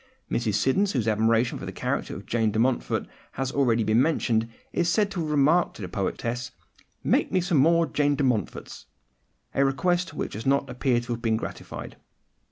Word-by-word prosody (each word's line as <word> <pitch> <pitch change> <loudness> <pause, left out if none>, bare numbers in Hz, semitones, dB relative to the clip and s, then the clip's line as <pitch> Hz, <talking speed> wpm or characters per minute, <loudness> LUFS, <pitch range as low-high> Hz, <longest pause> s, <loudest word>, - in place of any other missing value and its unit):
Mrs. 110 -4 0
Siddons, 160 - +2
whose 120 -6 0
admiration 115 +2 +2
for - - -7
the - - -4
character - - -3
of - - -9
Jane 115 -2 +1
de 105 - -3
Montfort 120 +2 +1 0.3
has 135 -1 -2
been 140 - -2
already 120 -4 +3
mentioned, 115 -4 +2 0.2
is 170 -1 +1
said 205 +2 +2
to 190 - -4
have 160 -2 -2
remarked 150 +4 +3
to 105 - -8
the - - -3
poetess, 115 +6 -3 0.5
"Make - - +2
me 185 - +3
some 175 -4 +1
more 165 +4 +4
Jane 145 -2 +1
de 140 - -1
Montforts"—a 125 +3 -4
request 175 +6 0
which - - -4
does 110 +5 -5
not 140 0 +2
appear 125 -1 +1
to 120 0 -4
have 115 - -6
been 110 -2 +1
gratified. - - -7
130 Hz, 185 wpm, -26 LUFS, 115-150 Hz, 0.5 s, more